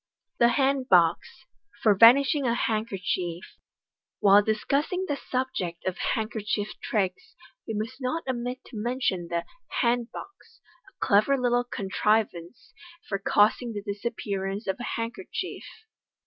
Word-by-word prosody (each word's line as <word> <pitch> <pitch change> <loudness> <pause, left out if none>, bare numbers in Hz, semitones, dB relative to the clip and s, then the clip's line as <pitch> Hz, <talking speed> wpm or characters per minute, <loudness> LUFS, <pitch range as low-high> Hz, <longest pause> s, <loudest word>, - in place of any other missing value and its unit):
The 235 - +6
Hand 270 -1 +1
Box, 170 -2 +2 0.4
for 215 - +6
Vanishing 265 +6 +6
a 235 - +2
Handkerchief. 195 -6 -2 0.4
— - - -66
Whil 200 -1 +6
discussing 280 - 0
the 290 - -1
subject 250 -11 -3
of 185 -1 -2 0.2
handkerchief 215 -1 -2
tricks, 215 - -2 0.3
we 225 - -3
must 230 +6 -5
not 265 +6 -2
omit 250 0 -3
ti 230 - -10
mention 210 -6 -1
the 170 0 -2 0.4
"hand 240 0 +1
box," 395 - -12 0.3
a - - -5
clever 215 +7 +4
little 245 -1 +2
contrivance 205 -2 -1 0.3
for 195 - -2
causing 215 +4 +2
the 205 -1 -5
disappearance 200 -1 -4
of 190 - -2
a 245 - -4
handkerchief. 230 - -5
220 Hz, 130 wpm, -26 LUFS, 200-250 Hz, 0.4 s, The